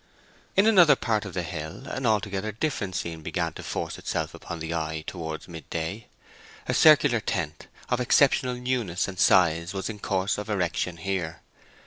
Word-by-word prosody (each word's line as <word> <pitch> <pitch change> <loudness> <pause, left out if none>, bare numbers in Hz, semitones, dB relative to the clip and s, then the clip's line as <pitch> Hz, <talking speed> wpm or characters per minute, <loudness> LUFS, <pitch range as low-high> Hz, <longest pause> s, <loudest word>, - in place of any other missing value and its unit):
In 195 - +5
another 185 -8 +7
part 110 -3 -1
of 95 - -7
the 90 - -1
hill 80 -1 -6
an 130 -1 -2
altogether 105 -1 0
different 105 - -2
scene 85 -2 -4
began - - -2
to - - -8
force - - -4
itself - - -3
upon 85 - -7
the 80 +1 -4
eye 80 -1 -3
towards 80 -3 -6
midday. 85 +4 -5 0.6
A - - 0
circular 145 -6 +6
tent, 75 -7 -3 0.2
of 125 - 0
exceptional 125 0 +3
newness 125 -8 -1
and 95 -2 -7
size, 85 -1 +4
was 95 +3 -2
in 105 - -10
course 95 +1 0
of 105 - -6
erection 90 -3 -1
here. 85 -2 -3
95 Hz, 165 wpm, -26 LUFS, 85-115 Hz, 0.6 s, another